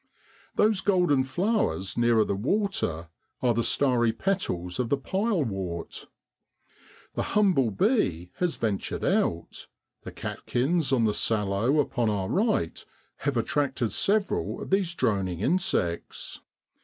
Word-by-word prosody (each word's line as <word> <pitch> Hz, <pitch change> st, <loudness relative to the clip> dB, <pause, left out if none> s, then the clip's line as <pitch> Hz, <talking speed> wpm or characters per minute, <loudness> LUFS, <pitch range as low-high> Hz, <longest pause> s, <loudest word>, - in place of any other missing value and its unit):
Those 210 Hz, -2 st, +3 dB
golden 180 Hz, -9 st, +3 dB
flowers 175 Hz, -, -1 dB
nearer 120 Hz, -2 st, +3 dB
the -, -, -1 dB
water 105 Hz, -, -1 dB, 0.3 s
are 120 Hz, -2 st, +4 dB
the 115 Hz, +1 st, 0 dB
starry 120 Hz, 0 st, +2 dB
petals 100 Hz, -, -2 dB
of 125 Hz, -2 st, 0 dB
the 140 Hz, -, +2 dB
pilewort. 130 Hz, -, -2 dB, 1.1 s
The -, -, -2 dB, 0.2 s
humble 180 Hz, -, +4 dB
bee 95 Hz, -, 0 dB
has 180 Hz, -2 st, 0 dB
ventured 105 Hz, -4 st, -2 dB
out; 85 Hz, 0 st, -1 dB, 0.3 s
the -, -, -8 dB
catkins 140 Hz, +3 st, -1 dB
on 125 Hz, -4 st, +3 dB
the 105 Hz, -, +2 dB
sallow 105 Hz, +7 st, +1 dB
upon 120 Hz, -5 st, +1 dB
our 100 Hz, -3 st, -1 dB
right 210 Hz, -, 0 dB, 0.3 s
have 140 Hz, -3 st, -1 dB
attracted 130 Hz, -1 st, 0 dB
several 200 Hz, -1 st, 0 dB
of -, -, -7 dB
these 190 Hz, -3 st, +1 dB
droning 95 Hz, -, 0 dB
insects. 100 Hz, -, -1 dB
125 Hz, 120 wpm, -27 LUFS, -, 1.1 s, are